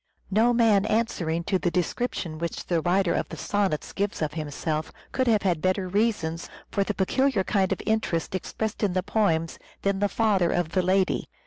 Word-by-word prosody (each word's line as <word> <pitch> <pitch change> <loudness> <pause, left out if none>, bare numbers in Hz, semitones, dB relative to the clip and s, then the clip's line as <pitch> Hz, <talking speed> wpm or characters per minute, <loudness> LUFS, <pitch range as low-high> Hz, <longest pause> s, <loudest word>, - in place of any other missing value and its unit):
No 225 +5 +4
man 220 -4 +4
answering 170 -7 0
to 190 +2 0
the 175 - +1
description 175 -2 -2
which 170 0 -4
the 170 -2 +1
writer 180 +1 +2
of - - -1
the - - -7
Sonnets 200 -7 -1
gives 200 +1 -2
of 150 -1 -2
himself 155 0 -3 0.2
could 260 -1 0
have 215 -4 +3
had 175 -5 +1
better 185 +1 +1
reasons 190 -5 0 0.2
for 200 - +1
the 210 +1 -3
peculiar 260 +2 +2
kind 190 -1 +1
of - - -2
interest 220 -7 0
expressed 210 +3 -3
in 200 -4 +1
the 185 0 0
poems 180 -6 0 0.2
than 195 -1 +1
the 205 0 +2
father 200 -7 +2
of 175 -2 0
the 185 +2 +1
lady. 185 +1 +1
190 Hz, 190 wpm, -26 LUFS, 170-210 Hz, 0.2 s, No